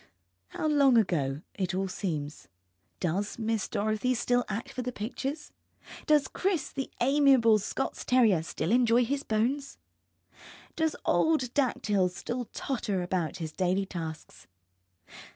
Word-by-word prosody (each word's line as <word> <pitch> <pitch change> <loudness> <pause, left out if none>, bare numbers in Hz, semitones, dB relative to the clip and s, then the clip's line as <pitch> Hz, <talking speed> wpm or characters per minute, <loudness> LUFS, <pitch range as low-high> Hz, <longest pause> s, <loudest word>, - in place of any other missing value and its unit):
How - - -5
long 280 -5 +5
ago 150 -9 +1
it 190 -2 -2
all 190 +1 0
seems. 155 -6 -4 0.5
Does 190 +4 -1
Miss 225 -2 -1
Dorothy 215 +4 0
still 245 +1 +1
act 215 +4 -4
for 255 - -4
the 250 0 -3
pictures? 270 +7 -5 0.5
Does 300 -3 +4
Chris, 370 -5 -1
the 270 -1 -4
amiable 265 -4 +5
Scots 240 +6 -3
terrier, 225 -9 +4
still 160 +2 -3
enjoy 240 0 +4
his 275 +3 -1
bones? 260 +5 -1 1.0
Does 320 -1 0
old 300 -7 +2
Dactyl 210 -9 +1
still 240 +7 -4
totter 210 -7 -3
about 175 -1 -2
his 160 -3 -5
daily 185 +3 0
tasks? 160 - -7
225 Hz, 130 wpm, -29 LUFS, 185-265 Hz, 1.0 s, long